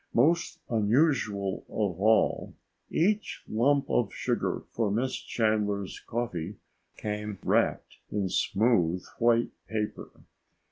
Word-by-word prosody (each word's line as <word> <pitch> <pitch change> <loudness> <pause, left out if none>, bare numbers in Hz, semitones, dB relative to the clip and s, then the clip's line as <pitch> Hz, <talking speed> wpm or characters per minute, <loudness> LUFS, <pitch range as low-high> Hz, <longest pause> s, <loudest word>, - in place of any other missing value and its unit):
Most 165 +8 +3
unusual 110 -4 +1
of 95 -4 -2
all, 110 +1 +3 0.3
each 205 +5 0
lump 135 +5 +2
of 115 -5 +1
sugar - - -1
for 115 -3 0
Miss 120 +6 0
Chandler's 105 -3 -1
coffee 105 -6 -3 0.4
came 105 -1 -4
wrapped - - +1
in 100 -2 -1
smooth 90 -3 +2
white 120 0 +3 0.2
paper. 105 -1 -3
110 Hz, 100 wpm, -28 LUFS, 100-120 Hz, 0.4 s, Most